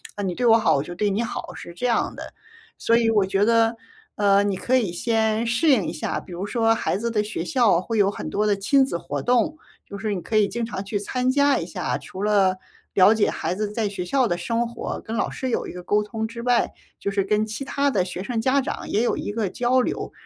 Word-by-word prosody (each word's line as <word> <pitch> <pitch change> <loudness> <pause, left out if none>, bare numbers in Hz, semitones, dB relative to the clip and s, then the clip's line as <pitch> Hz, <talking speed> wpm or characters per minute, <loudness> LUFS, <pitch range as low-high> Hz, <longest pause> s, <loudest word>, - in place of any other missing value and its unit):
“啊， 205 - -4
你 185 - -1
对 245 - -2
我 225 -1 +7
好， 225 - +3
我 140 - 0
就 175 - -8
对 205 +3 +1
你 200 +3 0
好”， 235 - -5
是 170 - -9
这 210 - -4
样 240 -2 +1
的。 - - -9 0.4
所 230 - +2
以 230 -1 +3
我 210 -3 +3
觉 195 +1 +1
得， 230 +1 +3 0.4
呃， 200 -1 +4
你 200 -2 0
可 255 +7 +1
以 205 -9 -1
先 220 +2 0
适 235 +8 +2
应 240 - +4
一 - - -2
下。 155 - -3
比 - - -14
如 175 +3 -4
说 225 +1 +2
孩 220 - -1
子 235 +3 -2
的 210 - +1
学 210 -6 -4
校， 215 -5 +3
会 225 +3 -3
有 200 -2 +4
很 205 - -5
多 210 +1 0
的 205 -1 +3
亲 265 +7 +3
子 215 - -3
活 145 -4 -4
动， 250 +6 +1 0.3
就 200 - -7
是 210 +1 -2
你 190 - -2
可 220 - -4
以 210 -2 +4
经 235 -1 -2
常 200 -4 -5
去 205 +1 -3
参 255 +4 0
加 285 +1 +3
一 - - -3
下。 - - -3
除 190 - -9
了 200 -3 +3 0.4
了 195 +2 +6
解 220 -2 +2
孩 180 - -3
子 210 0 -2
在 215 -1 -1
学 195 -2 -4
校 255 +7 +1
的 175 -4 -1
生 230 +6 -1
活， 235 - -5
跟 225 - -4
老 - - 0
师 260 - -4
有 - - -1
一 - - -6
个 180 - -7
沟 210 +3 +1
通 220 +1 -4
之 235 +1 -8
外， 245 0 +1 0.3
就 - - -2
是 195 -1 +1
跟 210 +2 +1
其 215 +5 -5
他 280 +1 0
的 205 -9 +1
学 180 0 -6
生 230 0 -2
家 265 +4 +2
长 265 - -4
也 210 - +1
有 240 - +1
一 - - -4
个 210 -3 -1
交 245 +5 +1
流。 - - -2
215 Hz, 280 characters per minute, -23 LUFS, 195-235 Hz, 0.4 s, 我